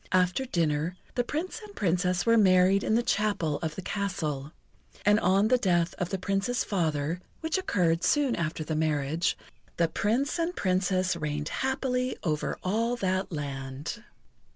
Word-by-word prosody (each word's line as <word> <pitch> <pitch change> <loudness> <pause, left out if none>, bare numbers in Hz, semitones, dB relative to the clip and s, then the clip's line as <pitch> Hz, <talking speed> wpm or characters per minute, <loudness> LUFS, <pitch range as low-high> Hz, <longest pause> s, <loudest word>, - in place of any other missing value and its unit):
After 185 +7 +2
dinner, 165 - 0 0.2
the 245 - +1
Prince 320 - -4
and 415 -1 -12
Princess 180 -1 +1
were 230 0 +5
married 190 -2 +5
in 220 - +2
the 235 - +2
chapel 200 -10 0
of 160 -2 -3
the 190 - -6
castle. 155 -9 -3 0.5
And 210 +1 +5
on 195 +3 +3
the 255 0 +4
death 175 -5 +2
of 180 - -1
the 195 - -1
Prince's 195 +5 0
father, 165 -3 -1 0.2
which 325 +3 0
occurred 175 - +1
soon 280 +4 +3
after 160 -1 -2
the 155 +1 -3
marriage, 155 +1 0 0.4
the 170 - +3
Prince 240 - 0
and 335 +2 -1
Princess 185 -1 +1
reigned 150 -2 -3
happily 260 -1 -1
over 155 -5 -1
all 230 +6 +1
that 190 -4 -1
land. 140 - -5
185 Hz, 155 wpm, -28 LUFS, 160-225 Hz, 0.5 s, were